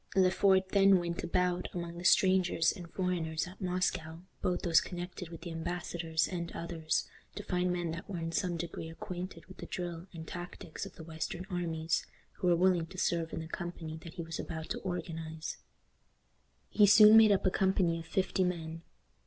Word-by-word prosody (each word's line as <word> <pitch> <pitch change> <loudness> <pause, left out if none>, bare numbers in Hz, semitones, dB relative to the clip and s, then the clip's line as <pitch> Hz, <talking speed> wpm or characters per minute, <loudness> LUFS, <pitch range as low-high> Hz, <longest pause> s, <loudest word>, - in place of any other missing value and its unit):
Le 185 -1 +5
Fort 190 -1 +3
then 195 -1 +6
went 170 -1 -3
about 180 0 0
among 170 -1 -4
the - - -7
strangers 185 -2 +4
and 175 -5 -9
foreigners 170 -4 -1
at 185 +3 -12
Moscow, 180 -3 -1 0.2
both 180 -1 0
those 165 -2 +5
connected 180 -1 -6
with 165 -1 -9
the 170 0 -6
embassadors 165 -1 -1
and 170 -2 -4
others, 165 -2 -1 0.3
to - - -5
find 180 0 0
men 175 -2 -1
that 165 +5 -7
were 190 - -3
in 165 0 -3
some 175 0 0
degree 165 -1 -5
acquainted 175 +1 -7
with 190 - -14
the - - -8
drill 175 -1 -5
and 160 -2 -8
tactics 175 -2 -6
of - - -14
the 160 - -9
western 165 +2 -5
armies, 165 -2 -1 0.3
who 180 - 0
were 175 - +5
willing 175 -1 +3
to 185 - -12
serve 170 -2 0
in - - -4
the 160 - -7
company 170 -1 -5
that 165 +1 -10
he 170 - -4
was 165 0 -6
about 160 -1 -5
to - - -2
organize. 165 -3 -5 1.1
He 205 -1 +6
soon 210 +2 +9
made 220 -1 +8
up 195 - +2
a 185 - +4
company 185 -3 +2
of 165 - -9
fifty 190 +2 +1
men. 165 -2 -3
175 Hz, 190 wpm, -32 LUFS, 165-185 Hz, 1.1 s, soon